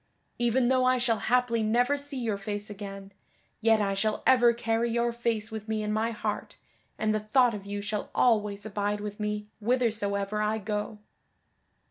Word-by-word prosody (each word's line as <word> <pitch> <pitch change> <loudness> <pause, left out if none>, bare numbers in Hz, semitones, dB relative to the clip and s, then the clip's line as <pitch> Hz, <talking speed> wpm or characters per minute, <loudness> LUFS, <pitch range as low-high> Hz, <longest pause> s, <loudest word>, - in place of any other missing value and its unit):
Even 240 +1 +2
though 260 -1 +3
I 255 0 +4
shall 235 -3 +1
haply 245 -1 +2
never 245 +6 +2
see 285 -1 -6
your 225 -5 -2
face 205 +1 -5
again, 195 -1 -8 0.5
yet 225 0 +4
I 200 -1 +1
shall 215 +2 -1
ever 245 -2 +6
carry 230 0 0
your 235 0 0
face 230 -2 -1
with 220 0 -6
me 220 -1 -1
in 210 0 -1
my 220 +2 +1
heart, 230 - -4 0.4
and 215 0 +1
the 215 - +1
thought 240 +3 +3
of 200 -1 -7
you 205 0 -4
shall 210 0 -3
always 210 -4 +2
abide 205 0 -1
with 205 0 -6
me 210 0 -2 0.2
withersoever 210 -3 0
I 215 +1 +1
go." 210 0 -3
215 Hz, 175 wpm, -28 LUFS, 210-235 Hz, 0.5 s, ever